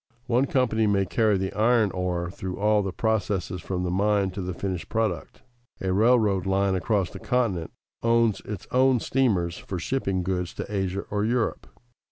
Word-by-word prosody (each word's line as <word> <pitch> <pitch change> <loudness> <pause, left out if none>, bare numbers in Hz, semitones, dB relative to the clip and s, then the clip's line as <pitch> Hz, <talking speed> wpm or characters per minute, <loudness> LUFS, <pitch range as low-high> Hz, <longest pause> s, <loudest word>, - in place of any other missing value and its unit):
One 125 +3 +2
company 115 -5 +1
may 100 -1 +2
carry 105 +2 +2
the 95 0 -3
iron 110 -1 +3
ore 90 -1 -2
through 95 -1 -6
all 105 +1 +3
the 95 -1 -3
processes 100 -4 -1
from 90 +1 -3
the 90 - -1
mine 100 0 +2
to 95 +1 -5
the 90 0 -3
finished 95 -2 -4
product. 110 -7 -2 0.4
A 95 -1 -1
railroad 105 -3 +3
line 95 0 +2
across 95 -1 0
the - - -9
continent 110 - 0 0.3
owns 115 -2 +3
its 105 -2 -7
own 130 0 +4
steamers 100 -10 0
for 95 - -5
shipping 95 -2 -1
goods 90 -1 -2
to - - -4
Asia 95 0 -1
or 105 0 0
Europe. 115 0 -1
100 Hz, 175 wpm, -26 LUFS, 95-110 Hz, 0.4 s, own